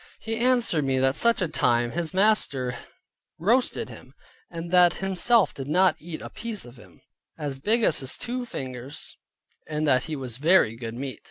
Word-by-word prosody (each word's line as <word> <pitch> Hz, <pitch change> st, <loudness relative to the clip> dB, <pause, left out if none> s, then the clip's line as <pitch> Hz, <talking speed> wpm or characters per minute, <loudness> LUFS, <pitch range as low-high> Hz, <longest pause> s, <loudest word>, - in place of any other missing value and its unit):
He 225 Hz, 0 st, -4 dB
answered 240 Hz, -, +2 dB
me 135 Hz, -1 st, 0 dB
that 135 Hz, +1 st, +2 dB
such 235 Hz, -4 st, +3 dB
a -, -, 0 dB
time 120 Hz, -5 st, +1 dB
his 170 Hz, +1 st, -1 dB
master 185 Hz, -, +1 dB, 0.6 s
roasted 235 Hz, +9 st, +1 dB
him, -, -, -13 dB, 0.3 s
and 170 Hz, 0 st, -7 dB
that 180 Hz, -1 st, +6 dB
himself 195 Hz, +3 st, +2 dB
did 135 Hz, -1 st, -7 dB, 0.3 s
eat 160 Hz, 0 st, -8 dB
a -, -, -7 dB
piece 225 Hz, -, -6 dB
of 120 Hz, +1 st, -14 dB
him, -, -, -18 dB, 0.4 s
as 145 Hz, -4 st, -4 dB
big 225 Hz, -, +1 dB
as 165 Hz, -, +3 dB
his 130 Hz, -1 st, -1 dB
two 250 Hz, +1 st, -4 dB
fingers, 130 Hz, -, -6 dB, 0.5 s
and 155 Hz, 0 st, -2 dB
that 130 Hz, -2 st, +3 dB
he 160 Hz, -, -4 dB
was 130 Hz, -3 st, -6 dB
very 155 Hz, -7 st, +4 dB
good 115 Hz, -1 st, -7 dB
meat. 130 Hz, +1 st, -6 dB
155 Hz, 175 wpm, -25 LUFS, 130-205 Hz, 0.6 s, that